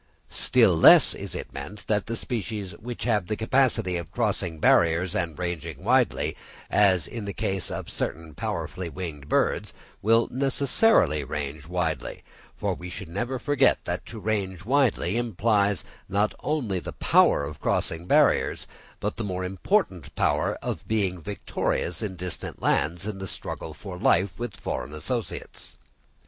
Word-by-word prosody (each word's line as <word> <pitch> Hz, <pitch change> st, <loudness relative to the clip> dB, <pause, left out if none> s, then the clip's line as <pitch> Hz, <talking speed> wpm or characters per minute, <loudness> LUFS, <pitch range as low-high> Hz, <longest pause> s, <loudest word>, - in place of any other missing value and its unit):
Still -, -, +5 dB
less -, -, +8 dB
is -, -, -6 dB
it -, -, -6 dB
meant, 105 Hz, +1 st, -8 dB
that 105 Hz, 0 st, 0 dB
species 110 Hz, -5 st, -3 dB
which 120 Hz, +1 st, -6 dB
have 105 Hz, -6 st, +1 dB
the 105 Hz, -, -1 dB
capacity 110 Hz, -6 st, +1 dB
of 85 Hz, -4 st, -6 dB
crossing 80 Hz, -2 st, -1 dB
barriers 85 Hz, +3 st, +3 dB
and 85 Hz, -4 st, -2 dB
ranging 85 Hz, -3 st, -4 dB
widely, -, -, +2 dB, 0.4 s
as 95 Hz, -6 st, +4 dB
in 115 Hz, -3 st, -5 dB
the 100 Hz, -, -5 dB
case 95 Hz, -3 st, -1 dB
of -, -, -5 dB
certain 80 Hz, 0 st, -4 dB
powerfully 90 Hz, +4 st, -4 dB
winged 80 Hz, -5 st, -7 dB
birds, -, -, +1 dB, 0.3 s
will 115 Hz, +2 st, +4 dB
necessarily 135 Hz, -, +3 dB
range 75 Hz, +2 st, -5 dB
widely; 80 Hz, -6 st, -2 dB, 0.3 s
for -, -, -1 dB
we 90 Hz, +1 st, -8 dB
should 90 Hz, -, -7 dB
never 120 Hz, +9 st, -2 dB
forget 145 Hz, +2 st, +3 dB
that -, -, -3 dB
to 110 Hz, -, -7 dB
range 95 Hz, -3 st, -2 dB
widely 120 Hz, -7 st, +2 dB
implies 105 Hz, -3 st, +1 dB, 0.3 s
not 100 Hz, +2 st, +1 dB
only 120 Hz, -12 st, -1 dB
the -, -, -7 dB
power -, -, +4 dB
of 75 Hz, 0 st, -7 dB
crossing 85 Hz, +2 st, 0 dB
barriers, -, -, +3 dB, 0.3 s
but -, -, -3 dB
the 115 Hz, -, -3 dB
more 95 Hz, -2 st, -3 dB
important 95 Hz, -, -1 dB
power -, -, +1 dB
of -, -, -4 dB
being 95 Hz, -5 st, 0 dB
victorious 90 Hz, 0 st, -2 dB
in 100 Hz, -4 st, -3 dB
distant 90 Hz, 0 st, -6 dB
lands 85 Hz, +6 st, +1 dB
in 105 Hz, -2 st, -4 dB
the 95 Hz, -, -5 dB
struggle 80 Hz, -, -5 dB
for 90 Hz, +3 st, -8 dB
life 90 Hz, +3 st, +2 dB
with 120 Hz, -5 st, -5 dB
foreign 75 Hz, -, -4 dB
associates. 105 Hz, +5 st, -5 dB
95 Hz, 150 wpm, -26 LUFS, 85-110 Hz, 0.4 s, less